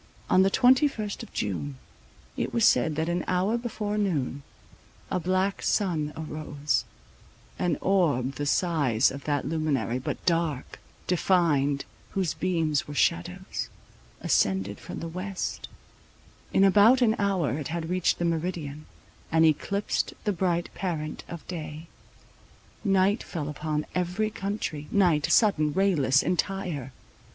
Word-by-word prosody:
On 185 - +6
the 190 - +4
twenty 255 +7 +5
first 215 -7 -5
of - - -10
June, 75 -9 -3 0.6
it - - -2
was 235 -2 +3
said 155 - +4
that 160 +2 -1
an 175 0 0
hour 185 +5 +1
before 215 -3 -2
noon, 145 -9 -1 0.7
a 185 - +1
black 185 +3 0
sun 165 -8 0
arose: 150 -2 -2 0.7
an 175 - +1
orb, 150 -10 +2
the 145 +1 -3
size 145 -9 +2
of 140 +1 -8
that 145 -2 0
luminary, 140 -8 0
but 130 - -5
dark, 165 -6 -1 0.3
defined, 160 -6 +2 0.3
whose 190 -4 0
beams 165 -5 0
were 145 - -7
shadows, 175 +4 -1 0.5
ascended 95 +1 +1
from - - -7
the 165 - -4
west; 185 +3 -4 0.8
in 195 - +4
about 210 +6 +6
an 220 -2 +3
hour 185 -8 +1
it 145 - -4
had 165 0 -3
reached 180 0 +1
the 175 - -1
meridian, 160 -3 -3 0.4
and 160 0 +5
eclipsed 200 +6 0
the 210 - +1
bright 175 -2 -1
parent 160 -5 -4
of 170 -2 -8
day. 160 -2 -6 1.0
Night 195 +1 +3
fell 155 -5 -5
upon 150 +1 -2
every 180 +4 -1
country, 195 -8 -4
night, 175 -7 +3
sudden, 160 -9 +4
rayless, 145 -9 +3
entire. 180 -7 -2
170 Hz, 135 wpm, -27 LUFS, 150-195 Hz, 1.0 s, On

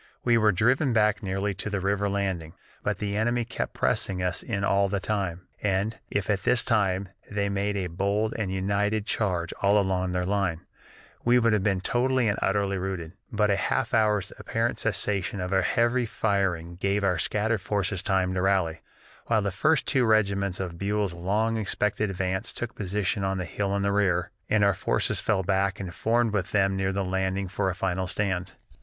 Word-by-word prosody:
We 120 -1 +4
were 110 -2 +4
driven 125 - +2
back 105 -2 +3
nearly 95 0 -1
to 95 +3 -4
the 100 -1 -1
river 100 +2 0
landing, 95 -5 -2 0.3
but 105 -1 -1
the 105 -1 -3
enemy 120 +2 +1
kept - - -4
pressing 90 -2 0
us 90 -1 0
in 100 -5 -3
all 100 0 +3
the 100 0 -1
time, 95 -3 -2 0.2
and, 100 +2 0
if, 105 -2 -1
at 100 -3 +1
this 120 +4 +2
time, 100 -4 +1 0.2
they 105 -1 -1
had 100 - -1
made 100 +1 -1
a 95 - -1
bold 100 +5 0
and 105 -4 -2
united 100 +2 0
charge 90 -7 -1
all 100 +1 +4
along 95 -2 +1
their 90 0 0
line, 95 -4 0 0.6
we 120 +1 +5
would 115 -2 +3
have 105 - +2
been 95 -2 +1
totally 130 +2 +1
and 100 - 0
utterly 100 -1 +1
routed; 90 -3 -4 0.2
but 105 -1 +2
a - - +3
half 95 - -1
hour's 105 -4 +2
apparent - - -1
cessation 100 -1 -1
of 90 0 -3
heavy 115 +6 +2
firing 95 -6 -1
gave 100 +2 0
our 90 -3 +2
scattered 105 +2 +1
forces 100 -1 -1
time 95 -2 +1
to 95 - 0
rally, 95 -4 +1 0.5
while 110 -3 +2
the 100 - -1
first 145 - +2
two 135 -3 +2
regiments 100 -4 +2
of 90 -3 -5
Buell's 100 -1 0
long 105 +6 0
expected 105 0 0
advance 95 +2 -2
took 120 0 -4
position 100 0 -1
on 95 0 0
the 90 - -3
hill 100 +3 -2
in 100 - 0
the 100 - +1
rear, 95 -4 +1 0.2
and 110 -1 +3
our 100 0 +5
forces - - 0
fell 95 - +1
back 95 +1 +1
and 90 -3 -5
formed 115 +3 +1
with 100 -4 -1
them 95 -1 +3
near 95 0 0
the 95 0 -1
landing 95 +1 -1
for 95 +1 -1
a 90 - -3
final 95 0 -1
stand. 95 -2 -2
100 Hz, 195 wpm, -27 LUFS, 95-105 Hz, 0.6 s, we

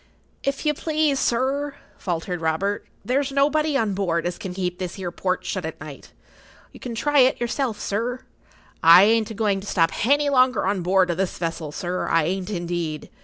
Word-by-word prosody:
"If 275 +2 -2
you 300 - +3
please, 305 -2 0
sir," 275 +4 0 0.2
faltered 175 -1 -3
Robert, 175 +6 -1 0.2
"there's 270 +2 0
nobody 295 +2 +2
on 220 -6 0
board 175 -4 -1
as 175 0 -3
can 190 - -5
keep 180 -1 -3
this 180 0 -5
'ere 180 -2 -4
port 185 +1 -2
shut 185 - -3
at 160 0 -6
night. 145 -2 -10 0.6
You - - -14
can 240 -2 -6
try 290 +5 +2
it 255 0 +4
yourself, 240 -1 -2
sir. 240 +5 -2 0.6
I 170 +3 +9
ain't 220 +1 +3
a 220 - -7
going 200 -2 0
to 200 - -10
stop 165 -4 +2
hany 285 +4 +2
longer 255 -4 +3
on 195 -1 0
board 185 0 +2
o' - - 0
this 190 +1 -2
vessel, 165 -3 -4
sir; 180 +4 -3
I 165 -1 +3
ain't, 185 +4 -2
indeed. 170 -5 -4
195 Hz, 190 wpm, -23 LUFS, 175-260 Hz, 0.6 s, I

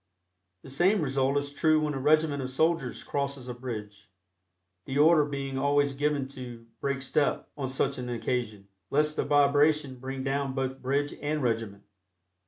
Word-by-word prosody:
The 135 - -10
same 185 +9 +3
result 135 0 +1
is 145 0 -2
true 155 +1 +3
when 150 -1 -1
a 135 - -3
regiment 150 0 +3
of 130 - -4
soldiers 160 -1 0
crosses 140 -2 -3
a 125 - -4
bridge, 105 -5 -7 0.8
the 135 - -2
order 155 0 +6
being 135 -2 -4
always 140 0 +2
given 145 -1 0
to 125 -4 -9
"break 140 -1 -2
step" 145 +1 0
on 140 -3 -3
such 135 +1 -1
an 125 -1 -5
occasion, 115 -4 -3 0.2
lest 150 +1 +2
the - - 0
vibration 145 -1 +3
bring 130 +1 -5
down 135 0 -1
both 130 0 -3
bridge 140 +3 0
and 150 0 -1
regiment. 110 -4 -2
140 Hz, 165 wpm, -28 LUFS, 130-145 Hz, 0.8 s, order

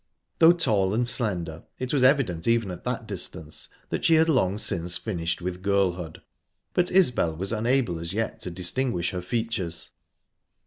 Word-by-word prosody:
Though 165 +1 +8
tall 105 - +1
and 120 +1 +1
slender, 90 -10 -2
it 130 +1 -3
was 140 - +3
evident 130 - +3
even 115 -4 +2
at 90 - -9
that - - -3
distance 80 0 -4 0.2
that - - -2
she 165 - +5
had 160 +1 +4
long 100 - +2
since 90 -5 -2
finished 85 -5 -3
with 90 0 -4
girlhood, 95 -4 0 0.5
but 180 0 +2
Isbel 125 - +3
was 95 +6 -3
unable 115 -5 +1
as 85 +1 -5
yet 110 +3 -2
to - - -4
distinguish 90 +2 -1
her 90 - -3
features. 95 -4 -3
100 Hz, 165 wpm, -26 LUFS, 85-125 Hz, 0.5 s, Though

